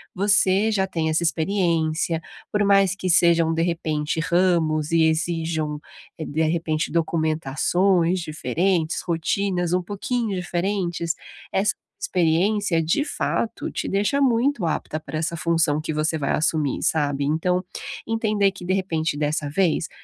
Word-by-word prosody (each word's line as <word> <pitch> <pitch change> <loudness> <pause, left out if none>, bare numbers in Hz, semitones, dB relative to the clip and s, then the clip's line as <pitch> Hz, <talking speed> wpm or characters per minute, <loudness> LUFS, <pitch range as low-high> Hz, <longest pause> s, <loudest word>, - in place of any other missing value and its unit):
você 200 +1 +3
já 190 -3 +1
tem 165 -4 -1
essa 155 +2 +1
experiência, 165 -2 0 0.3
por 210 0 +1
mais 195 -1 +4
que 185 -2 -3
sejam, 170 -2 +4
de 165 - 0
repente, 160 -2 -1
ramos 165 -3 +1
e 165 -1 +4
exijam, 160 -2 -1 0.4
eh, 160 - -5
de 160 +2 -1
repente, 160 -1 0
documentações 165 +3 +1
diferentes, 165 +1 -1
rotinas 175 +1 -1
um 180 0 +1
pouquinho 210 +3 -2
diferentes, 175 -2 -2 0.4
essa 205 +2 +2 0.3
experiência, 180 +1 +1
de 165 - +1
fato, 235 -5 -2
te - - -4
deixa 205 +8 +1
muito 245 -4 +2
apta 155 -1 -2
pra 155 0 -6
essa 165 +2 -2
função 165 -2 +1
que 155 0 -3
você 155 +1 0
vai 145 - -1
assumir, 150 -2 0
sabe. 145 -3 +1
Então, 170 +5 +1 0.5
entender 215 -3 +1
que, 185 -1 -11
de 185 +1 0
repente, 165 -5 -1
dessa 150 0 -1
vez, 170 0 +1
170 Hz, 140 wpm, -23 LUFS, 160-190 Hz, 0.5 s, mais